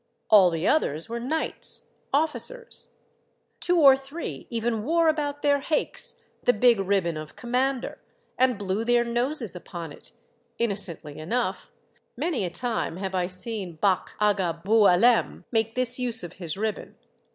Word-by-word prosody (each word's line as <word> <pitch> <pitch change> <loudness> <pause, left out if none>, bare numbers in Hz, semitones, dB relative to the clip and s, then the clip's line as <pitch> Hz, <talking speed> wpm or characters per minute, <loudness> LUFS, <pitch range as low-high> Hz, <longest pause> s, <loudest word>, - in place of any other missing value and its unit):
All 195 -4 +8
the 165 0 -2
others 160 - +1
were 235 +1 -4
knights, 305 +7 -3 0.2
officers; 320 - -1 0.7
two 355 0 +2
or 275 -4 +8
three 275 +5 -7
even 230 -2 -2
wore 330 +5 +2
about 290 -2 -1
their 285 -1 +3
haiks 300 +2 0 0.3
the 245 - +3
big 235 0 +4
ribbon 190 -4 0
of 155 0 -8
Commander, 255 +1 -2 0.4
and 255 -3 +2
blew 200 +2 -2
their 240 0 +3
noses 240 -1 -1
upon 170 -2 -8
it, - - -12 0.5
innocently 190 -9 +3
enough 230 +10 -2 0.5
(many 315 - -1
a - - -2
time 230 -4 -3
have 190 0 -4
I 180 -1 0
seen 190 0 -4
Bach' 190 +2 0
Aga 190 -5 0
Boualem 220 +2 +4
make 225 -1 0
this 250 0 +1
use 240 -4 0
of 175 0 -7
his 170 -2 -6
ribbon). 215 0 -4
225 Hz, 145 wpm, -25 LUFS, 185-260 Hz, 0.7 s, All